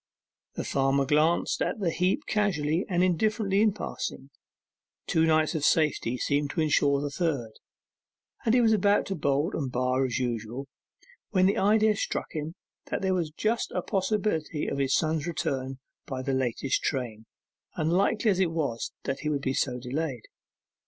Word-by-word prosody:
The - - -3
farmer 135 0 +1
glanced 155 +4 +2
at - - -1
the 180 -5 0
heap 185 - 0
casually 180 -5 0
and 180 -1 +2
indifferently 200 +2 +2
in 215 -1 +4
passing; 140 -8 -5 0.7
two 160 0 +2
nights 155 -1 +3
of 155 -3 -2
safety 150 -7 +2
seemed 145 +2 0
to 160 - -1
ensure 145 -2 +3
the 145 -1 -3
third; 140 -8 -1 0.9
and 225 +1 +3
he 250 - +5
was 225 -1 +4
about 205 0 +3
to 195 - -3
bolt 145 0 0
and 135 -5 -2
bar 130 +1 +1
as 125 -3 -1
usual, 120 +1 -3 0.6
when 185 -3 +3
the 195 - +2
idea 215 +2 +4
struck - - -3
him 155 +1 -4 0.3
that - - -3
there 190 0 +2
was 170 -4 0
just 215 +9 -1
a - - -1
possibility 190 -7 -1
of - - -2
his 135 0 +2
son's 160 -1 0
return 135 -5 -2 0.3
by 130 -2 -4
the 135 - -1
latest 130 0 0
train, 115 -6 -3 0.5
unlikely 195 +7 +2
as 190 - 0
it 185 -3 +3
was 145 -8 -2
that 135 - -3
he 150 - -2
would 140 -2 -1
be 130 - 0
so 125 -2 0
delayed. 125 0 -3
155 Hz, 170 wpm, -28 LUFS, 135-190 Hz, 0.9 s, he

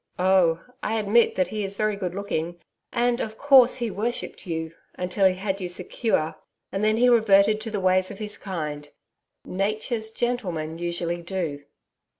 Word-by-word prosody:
Oh! 180 -3 +3 0.2
I 220 +1 -1
admit 220 +2 +3
that 185 - +1
he 215 -1 -3
is 195 0 -4
very 215 0 0
good 185 -3 -4
looking, 175 -4 -3 0.3
and, 240 0 +1
of 220 0 -5
course, 270 -4 +6
he 235 -3 -2
worshipped 220 0 -4
you 160 -1 -3 0.2
until 185 +2 +2
he 185 - +1
had 195 +1 -3
you 180 - -2
secure, 175 -3 -1 0.3
and 195 - -2
then 215 +1 +3
he 245 +2 +4
reverted 215 -3 +5
to 225 - -3
the 210 -2 -2
ways 185 0 +3
of - - -8
his 210 0 -2
kind. 150 -6 -5 0.6
"Nature's 215 +4 -1
gentlemen" 180 -10 -2
usually 175 0 -2
do....' 170 -6 -4
195 Hz, 165 wpm, -25 LUFS, 175-220 Hz, 0.6 s, course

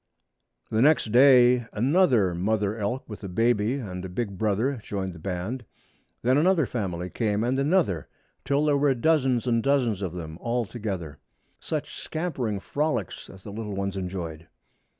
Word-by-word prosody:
The 110 - +2
next 145 -5 +4
day 125 -1 +6
another 125 - +3
mother 105 +3 0
elk 115 +4 -3
with 105 -1 -9
a 100 - -5
baby 115 +4 +1
and 95 -9 -5
a 95 - -5
big 100 +2 -3
brother 110 +7 0
joined 100 -4 -4
the 85 - -11
band. 95 +8 -4 0.6
Then 130 +4 +4
another 170 -2 +3
family 90 -7 -4
came, 105 -2 0
and 130 +3 0
another, 140 - +1 0.4
till 140 +2 +1
there 145 -2 +3
were 140 -1 +3
dozens 130 -3 +2
and 115 -2 +2
dozens 125 -7 +1
of 90 -4 -3
them 80 -2 -7
all 120 0 -1
together. 95 - -5 0.4
Such - - -4
scampering 135 - -3
frolics 140 - -2
as 95 -1 -13
the 105 - -8
little 105 -1 -5
ones 100 0 -2
enjoyed! 90 -4 -5
110 Hz, 160 wpm, -26 LUFS, 95-130 Hz, 0.6 s, day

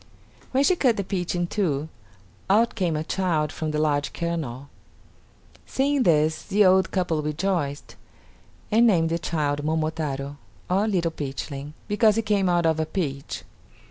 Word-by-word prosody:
When 265 +1 +3
she 370 - +4
cut 250 -9 +2
the 200 - -1
peach 180 -2 -2
in 175 0 0
two, 160 -6 -1 0.6
out 225 +4 +4
came 180 -7 0
a 155 - -1
child 160 -3 0
from 155 - -3
the 150 - -2
large 145 -2 0
kernel. 150 -6 -3 1.0
Seeing 280 +1 +1
this 155 -6 +3
the 205 +1 +3
old 190 0 +4
couple 175 -5 0
rejoiced, 150 -1 -2 0.8
and 230 +3 +5
named 165 -6 +3
the 165 +1 -1
child 145 -3 -1
Momotaro, 155 -3 -2 0.3
or 195 +4 +2
Little 175 -5 +1
Peachling, 140 -1 -5
because 210 0 +3
he 225 - 0
came 205 -3 +1
out 175 -1 +2
of 160 -1 +2
a 160 - +1
peach. 140 -7 -4
170 Hz, 155 wpm, -25 LUFS, 150-195 Hz, 1.0 s, and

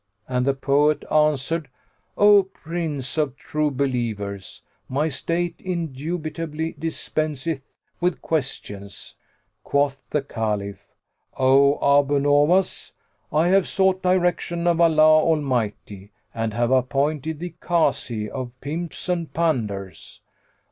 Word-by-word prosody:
and 125 0 0
the 140 - +4
poet 145 +2 +2
answered, 150 0 +1 0.5
"O 205 0 +7
Prince 160 -6 -4
of 140 -4 0
True 150 0 -1
Believers, 115 -8 -3 0.3
my 145 +4 0
state 170 +4 -2
indubitably 160 -1 -4
dispenseth 155 -2 -2 0.4
with 175 0 0
questions." 100 -10 -4 0.5
Quoth 140 -1 0
the 150 - 0
Caliph, 105 -6 -3 0.5
"O 140 +2 +5 0.2
Abu 145 0 +1
Nowas, 145 +7 +2 0.4
I 160 +3 +3
have 195 -1 +4
sought 190 -1 +2
direction 175 -1 +1
of 170 -1 +3
Allah 155 -1 +6
Almighty 120 -10 -1 0.2
and 115 -1 -2
have 120 +1 +1
appointed 140 +4 0
thee 175 +1 -6
Kazi 120 -10 0
of 125 +1 -7
pimps 160 +3 -5
and 170 -3 -1
panders." 110 - -2
150 Hz, 105 wpm, -23 LUFS, 130-165 Hz, 0.5 s, O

